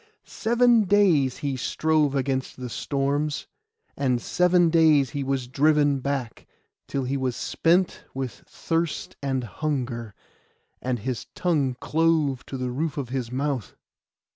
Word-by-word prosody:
Seven 235 -1 +3
days 180 -10 +3
he 140 -3 -2
strove 150 +2 +1
against 135 -1 -1
the 125 -2 -6
storms, 145 +3 -1 0.5
and 130 -3 +1
seven 180 +4 +3
days 155 -5 +4
he 140 -1 -3
was 135 -2 -2
driven 145 +1 +3
back, 135 -3 -4 0.4
till 135 - -2
he 130 +2 -2
was 130 -2 -1
spent 175 +2 +1
with 130 -4 -5
thirst 165 -1 -2
and 135 -2 -1
hunger, 120 -3 -3 0.7
and 125 -1 -1
his 120 +1 -4
tongue 145 -8 +1
clove 155 -4 +1
to 135 - -5
the 125 -1 -3
roof 150 +4 -2
of 135 -4 -3
his 125 -2 -3
mouth. 135 -4 -2
140 Hz, 135 wpm, -25 LUFS, 130-160 Hz, 0.7 s, days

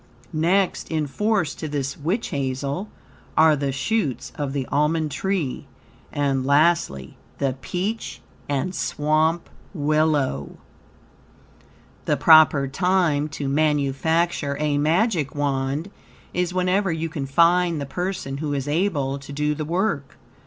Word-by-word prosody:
Next 175 +5 +1
in 155 -2 0
force 195 +2 0
to 155 - -6
this 140 -2 -3
witch 175 +10 -2
hazel 140 +7 -3 0.5
are 160 -1 +6
the 140 -1 -1
shoots 145 - -1
of 145 -2 -3
the 135 -2 -2
almond 150 +1 +1
tree, 165 -2 -2 0.4
and, 140 -2 0
lastly, 140 - +2 0.2
the 135 -2 0
peach 190 - -3 0.3
and 145 +6 -1
swamp 155 +1 0 0.3
willow. 150 - 0 1.5
The - - +1
proper 155 -4 +6
time 160 -1 +1
to 145 -1 -4
manufacture 150 +1 +1
a 150 -1 +1
Magic 160 - +1
Wand 140 +4 -1 0.4
is 180 0 0
whenever 185 +1 +1
you 165 0 -2
can 145 -4 -5
find 170 +3 +3
the 140 - -3
person 180 -3 -4
who 150 -1 -2
is 135 0 -3
able 145 -4 0
to 140 +1 -11
do 150 +1 0
the 150 0 -4
work. 170 -4 -1
150 Hz, 125 wpm, -23 LUFS, 140-175 Hz, 1.5 s, are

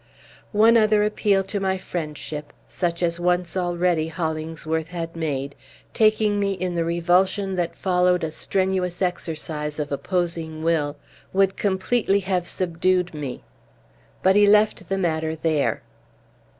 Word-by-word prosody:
One 225 +2 +6
other 215 -1 +4
appeal 205 -2 +2
to 200 +2 -3
my 190 -1 0
friendship, 150 -4 -6
such 170 -1 -2
as 170 0 0
once, 175 0 0
already, 175 -3 +1
Hollingsworth 160 -1 -3
had 165 -1 -5
made, 140 -4 -3 0.4
taking 215 -1 +3
me 200 -1 +1
in 185 -1 -3
the 170 -1 0
revulsion 180 +4 +1
that 170 -1 -1
followed 180 -1 +2
a 160 - -2
strenuous 185 +1 -1
exercise 155 -4 -3
of 150 -2 -3
opposing 165 0 -2
will, 155 -3 0 0.4
would 195 0 +3
completely 200 +1 +1
have 185 -2 -1
subdued 180 0 0
me. 145 -4 -6 0.8
But 190 +1 +5
he 205 0 +6
left 210 +1 +3
the 195 - 0
matter 160 -3 -1
there. 155 -2 0
175 Hz, 135 wpm, -23 LUFS, 160-190 Hz, 0.8 s, One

